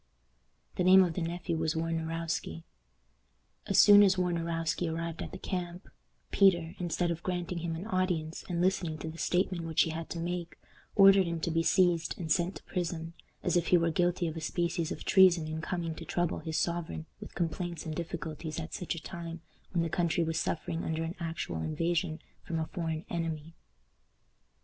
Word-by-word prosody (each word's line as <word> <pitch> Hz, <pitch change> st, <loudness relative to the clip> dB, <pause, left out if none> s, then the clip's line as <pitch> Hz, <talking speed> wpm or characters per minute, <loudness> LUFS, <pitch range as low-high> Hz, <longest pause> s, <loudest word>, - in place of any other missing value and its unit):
The -, -, +2 dB
name 190 Hz, +1 st, +8 dB
of 175 Hz, -3 st, -1 dB
the 180 Hz, -, -3 dB
nephew 170 Hz, 0 st, -2 dB
was 160 Hz, 0 st, 0 dB
Warnarowski. 165 Hz, -, -2 dB, 1.0 s
As 195 Hz, -2 st, +1 dB
soon 205 Hz, +1 st, +9 dB
as 195 Hz, -2 st, +5 dB
Warnarowski 170 Hz, -2 st, -1 dB
arrived 165 Hz, 0 st, -4 dB
at -, -, -5 dB
the -, -, -6 dB
camp, 180 Hz, -1 st, -4 dB, 0.4 s
Peter, 175 Hz, -4 st, +4 dB
instead 175 Hz, 0 st, 0 dB
of 170 Hz, 0 st, -4 dB
granting 180 Hz, -1 st, -2 dB
him 165 Hz, -1 st, -3 dB
an 170 Hz, +5 st, -6 dB
audience, 180 Hz, -6 st, -1 dB
and 175 Hz, -1 st, -1 dB
listening 180 Hz, -4 st, +1 dB
to 160 Hz, -, -5 dB
the 165 Hz, -, -11 dB
statement 180 Hz, -1 st, 0 dB
which 165 Hz, -1 st, +3 dB
he 165 Hz, -, -2 dB
had 160 Hz, +1 st, -5 dB
to 170 Hz, -, -4 dB
make, 170 Hz, -1 st, -4 dB, 0.4 s
ordered 195 Hz, -2 st, +7 dB
him 170 Hz, -1 st, -2 dB
to 170 Hz, -, -1 dB
be 165 Hz, +1 st, +2 dB
seized 170 Hz, -1 st, +2 dB
and 160 Hz, -3 st, -4 dB
sent 175 Hz, +4 st, +2 dB
to -, -, -10 dB
prison, 170 Hz, -2 st, -3 dB, 0.3 s
as 180 Hz, -, +1 dB
if 175 Hz, -1 st, +2 dB
he 180 Hz, -, +6 dB
were 165 Hz, -1 st, +2 dB
guilty 175 Hz, +1 st, +1 dB
of 160 Hz, -, -4 dB
a 160 Hz, -, -5 dB
species 170 Hz, +1 st, -1 dB
of -, -, -6 dB
treason 180 Hz, -4 st, +5 dB
in 155 Hz, 0 st, -4 dB
coming 170 Hz, -1 st, -3 dB
to 165 Hz, -, -8 dB
trouble 175 Hz, +1 st, -1 dB
his 160 Hz, -1 st, -3 dB
sovereign 170 Hz, -2 st, -2 dB
with -, -, -10 dB
complaints 170 Hz, 0 st, -3 dB
and 160 Hz, -, -3 dB
difficulties 160 Hz, -1 st, -5 dB
at 160 Hz, 0 st, -6 dB
such 180 Hz, -, -3 dB
a 165 Hz, -, -8 dB
time, 170 Hz, -2 st, -7 dB, 0.3 s
when 170 Hz, -3 st, +1 dB
the -, -, 0 dB
country 170 Hz, 0 st, +1 dB
was 160 Hz, 0 st, -1 dB
suffering 165 Hz, 0 st, -2 dB
under 160 Hz, 0 st, -1 dB
an 165 Hz, +1 st, -3 dB
actual 160 Hz, -, -3 dB
invasion 165 Hz, -, -1 dB, 0.2 s
from 165 Hz, -, -4 dB
a 160 Hz, -, -1 dB
foreign 160 Hz, -1 st, -4 dB
enemy. 165 Hz, -2 st, -3 dB
170 Hz, 190 wpm, -31 LUFS, 160-175 Hz, 1.0 s, soon